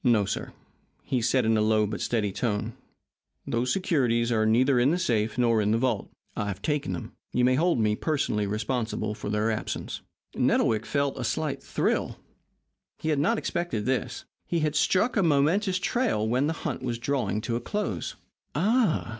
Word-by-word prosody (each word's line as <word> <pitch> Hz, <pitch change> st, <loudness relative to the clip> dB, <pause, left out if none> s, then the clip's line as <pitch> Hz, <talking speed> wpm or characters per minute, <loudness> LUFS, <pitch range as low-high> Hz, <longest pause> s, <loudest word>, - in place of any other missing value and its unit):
"No, 115 Hz, -6 st, +4 dB
sir," -, -, -4 dB, 0.5 s
he 130 Hz, -3 st, -1 dB
said, 125 Hz, +1 st, +2 dB
in 110 Hz, 0 st, +3 dB
a -, -, +2 dB
low 110 Hz, 0 st, +3 dB
but 105 Hz, +1 st, -4 dB
steady 105 Hz, -4 st, 0 dB
tone; 110 Hz, +1 st, -2 dB, 0.7 s
"those 120 Hz, +2 st, 0 dB
securities 125 Hz, -11 st, +1 dB
are 110 Hz, -2 st, +2 dB
neither 125 Hz, +4 st, +4 dB
in 125 Hz, +3 st, +4 dB
the 170 Hz, -, +2 dB
safe 110 Hz, -9 st, 0 dB
nor 115 Hz, -3 st, +3 dB
in 105 Hz, -, +1 dB
the 110 Hz, -, +3 dB
vault. 120 Hz, -4 st, 0 dB, 0.3 s
I 105 Hz, -, -2 dB
have 95 Hz, -2 st, -4 dB
taken 145 Hz, -11 st, -1 dB
them. 85 Hz, -, -6 dB, 0.2 s
You 125 Hz, -, +3 dB
may 130 Hz, -, +4 dB
hold 170 Hz, +5 st, +2 dB
me 105 Hz, -1 st, +2 dB
personally 105 Hz, -8 st, 0 dB
responsible 110 Hz, 0 st, -2 dB
for 105 Hz, -, -6 dB
their 105 Hz, +2 st, +1 dB
absence." 110 Hz, -, -4 dB, 0.3 s
Nettlewick 110 Hz, -2 st, +2 dB
felt 140 Hz, -1 st, 0 dB
a -, -, -2 dB
slight 140 Hz, +2 st, -2 dB
thrill. -, -, -1 dB, 0.8 s
He 160 Hz, -, -3 dB
had 150 Hz, -2 st, +2 dB
not 225 Hz, +11 st, +2 dB
expected 170 Hz, -, -2 dB
this. 130 Hz, 0 st, -2 dB, 0.2 s
He 170 Hz, -2 st, 0 dB
had 150 Hz, -1 st, +1 dB
struck 190 Hz, +10 st, +2 dB
a 205 Hz, -, +3 dB
momentous 175 Hz, +5 st, +2 dB
trail 205 Hz, -, 0 dB
when 125 Hz, +5 st, +1 dB
the 160 Hz, -, 0 dB
hunt 150 Hz, -6 st, -2 dB
was 120 Hz, -2 st, -2 dB
drawing 130 Hz, -3 st, -1 dB
to 115 Hz, +1 st, -2 dB
a 120 Hz, -, -2 dB
close. 115 Hz, -, -3 dB, 0.4 s
"Ah!" 205 Hz, -, +2 dB
125 Hz, 185 wpm, -27 LUFS, 110-150 Hz, 0.8 s, No